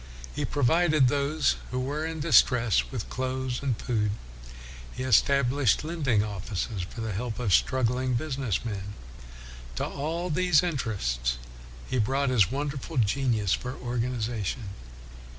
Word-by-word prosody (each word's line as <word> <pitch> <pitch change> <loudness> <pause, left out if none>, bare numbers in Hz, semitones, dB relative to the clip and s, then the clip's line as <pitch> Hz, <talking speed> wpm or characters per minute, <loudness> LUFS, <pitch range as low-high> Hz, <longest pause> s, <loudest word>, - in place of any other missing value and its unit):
He - - -1
provided 150 0 +3
those 145 +2 +1
who 125 - -2
were 145 +5 -2
in 160 -1 -4
distress 115 - +4
with - - -5
clothes 130 -1 -2
and 130 -5 -1
food. 105 -4 0 0.8
He 130 - -5
estab 130 +1 +4
lished 140 -4 +2
lending 145 -10 +1
offices 100 0 -4
for 100 +6 -7
the 110 -1 -3
help 110 +3 -3
of 115 -7 0
struggling 130 +1 +2
business 130 - -2
men. 100 -2 -5 0.8
To - - -1
all 165 +5 -3
these 175 -1 +3
in 175 -3 -1
terests 60 - -1 0.5
he 130 - -1
brought 135 +5 +1
his 110 -5 +4
wonderful 140 +2 -4
genius 110 -3 +2
for 125 0 -3
organization. 120 -3 -3
125 Hz, 135 wpm, -27 LUFS, 110-140 Hz, 0.8 s, distress